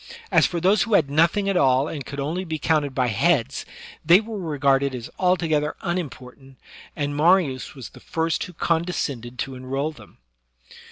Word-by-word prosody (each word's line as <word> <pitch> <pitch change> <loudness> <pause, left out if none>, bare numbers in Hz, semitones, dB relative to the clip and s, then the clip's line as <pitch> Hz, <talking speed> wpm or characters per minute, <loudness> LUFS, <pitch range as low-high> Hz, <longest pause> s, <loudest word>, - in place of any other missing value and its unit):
As - - +5
for 175 - -3
those 190 +5 +3
who 225 -3 +2
had 145 -7 +2
nothing 170 +7 +2
at 195 - +1
all 135 -3 +3
and 150 -4 -5
could 140 +2 -7
only 160 +7 -2
be 160 -3 -4
counted 150 -3 0
by 130 - +2
heads, 130 +3 +1 0.4
they 175 +3 +7
were 220 -1 -6
regarded 140 -5 +1
as 120 -2 -8
altogether 165 -5 +1
unimportant, 135 -6 -6 0.4
and 145 -1 -2
Mariiis 155 -4 +2
was 130 -4 -8
the - - -15
first 165 -1 -2
who 180 - -11
condescended 155 -8 -2
to 135 - -4
enroll 135 +4 -3
them. 155 - -16
150 Hz, 170 wpm, -23 LUFS, 135-175 Hz, 0.4 s, they